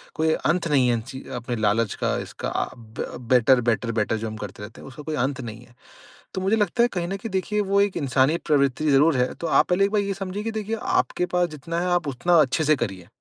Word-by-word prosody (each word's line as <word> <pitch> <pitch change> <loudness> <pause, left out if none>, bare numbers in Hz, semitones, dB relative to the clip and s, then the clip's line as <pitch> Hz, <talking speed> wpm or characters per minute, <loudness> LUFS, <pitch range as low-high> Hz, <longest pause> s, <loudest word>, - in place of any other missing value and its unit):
कोई 160 0 +2
अंत 170 +3 0
नहीं 135 -5 +3
है 120 - +3
इन 115 - -1
चीज़ 130 - -9
अपने 120 +1 -3
लालच 110 -1 +1
का - - +1
इसका - - -5
अ, - - -3
ब 110 -2 -7 0.2
बेटर-बेटर, 120 -1 +3
बेटर 110 0 0
जो 110 +1 -4
हम 110 0 -6
करते 105 -1 -8
रहते 105 - -10
हैं, - - -11
उसका 135 +3 -10
कोई 155 +1 -3
अंत 130 +1 -1
नहीं 115 -1 -8
है। 120 - -23 0.6
तो 190 - -3
मुझे 195 +4 +2
लगता 215 +2 +2
है 240 - +5
कहीं 175 -2 -2
न 195 +2 -3
कहीं 225 - -5
देखिए 190 +3 0
वो 200 0 +5
एक 200 -1 0
इंसानी 140 +2 +2
प्रवृत्ति 145 0 +2
ज़रूर 140 +1 +4
है। 125 0 +1
तो 170 - -5
आप - - +4
पहले 185 +2 +3
एक 200 - -2
बार 210 -1 +2
ये 200 0 -2
समझिए 195 +1 -5
कि 225 - -2
देखिए 220 0 -3 0.2
आपके 180 - -1
पास 175 -1 +2
जितना 155 +3 -4
है 180 - -1
आप 155 - -9
उतना 140 +6 0
अच्छे 145 +2 +1
से 155 0 +4
करिए। 95 -9 -4
150 Hz, 255 wpm, -24 LUFS, 120-180 Hz, 0.6 s, है